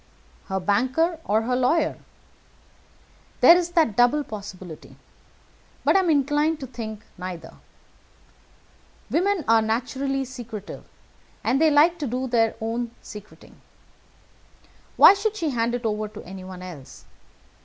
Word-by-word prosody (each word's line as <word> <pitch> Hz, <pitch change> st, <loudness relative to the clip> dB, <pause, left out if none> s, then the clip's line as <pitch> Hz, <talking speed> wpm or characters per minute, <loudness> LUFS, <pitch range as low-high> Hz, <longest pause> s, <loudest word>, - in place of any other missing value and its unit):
"Her 190 Hz, -1 st, -2 dB
banker 260 Hz, -, +1 dB
or 215 Hz, +2 st, +1 dB
her 250 Hz, +2 st, 0 dB
lawyer. 255 Hz, +6 st, +1 dB, 1.4 s
There 340 Hz, -, +9 dB
is 350 Hz, -1 st, 0 dB
that 315 Hz, -, +2 dB
double 245 Hz, +6 st, +3 dB
possibility. 190 Hz, -, -9 dB, 0.9 s
But -, -, +3 dB
I -, -, +6 dB
am 370 Hz, -3 st, +1 dB
inclined 295 Hz, +2 st, +2 dB
to -, -, -4 dB
think 220 Hz, -4 st, -7 dB, 0.2 s
neither. 180 Hz, -3 st, -7 dB, 1.6 s
Women 375 Hz, -1 st, +1 dB
are 225 Hz, 0 st, +5 dB
naturally 265 Hz, +5 st, -2 dB
secretive, 235 Hz, -5 st, -9 dB, 0.6 s
and 270 Hz, -, +1 dB
they 320 Hz, -, +6 dB
like 315 Hz, +4 st, +4 dB
to 290 Hz, -, -2 dB
do 250 Hz, +2 st, -2 dB
their 225 Hz, -2 st, +2 dB
own 230 Hz, +2 st, -3 dB
secreting. 210 Hz, 0 st, -13 dB, 1.4 s
Why -, -, +9 dB
should 415 Hz, +2 st, -2 dB
she 330 Hz, -8 st, -2 dB
hand 235 Hz, -1 st, 0 dB
it 245 Hz, -1 st, -5 dB
over 215 Hz, -1 st, -1 dB
to 210 Hz, 0 st, -11 dB
anyone 185 Hz, 0 st, -9 dB
else? 160 Hz, -8 st, -11 dB
245 Hz, 130 wpm, -24 LUFS, 215-300 Hz, 1.6 s, There